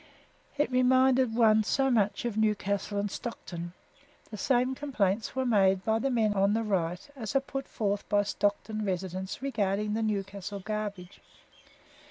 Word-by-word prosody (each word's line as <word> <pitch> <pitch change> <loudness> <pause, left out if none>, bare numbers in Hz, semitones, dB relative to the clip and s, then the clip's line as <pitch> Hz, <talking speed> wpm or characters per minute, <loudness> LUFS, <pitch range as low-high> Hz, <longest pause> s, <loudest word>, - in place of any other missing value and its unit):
It 285 -3 +1
reminded 255 -1 +4
one 220 -2 +5
so 270 +5 +1
much 210 -1 +1
of 235 -3 -2
Newcastle 205 -1 0
and 200 0 -1
Stockton. 175 -7 -6 0.6
The 215 - -6
same 255 +2 +2
complaints 225 -8 -1
were 260 0 0
made 195 -5 +3
by 220 0 +2
the 275 - 0
men 225 -4 +2
on 200 +1 +2
the 225 - 0
right 180 - -1
as 230 -1 -5
are - - +6
put 270 0 -6
forth 205 -2 -2
by 205 -1 +3
Stockton 205 +1 -1
residents 190 +3 -3
regarding 210 -5 0
the 225 - -1
Newcastle 200 -2 -3
garbage. 205 -3 -5
215 Hz, 155 wpm, -29 LUFS, 200-240 Hz, 0.6 s, are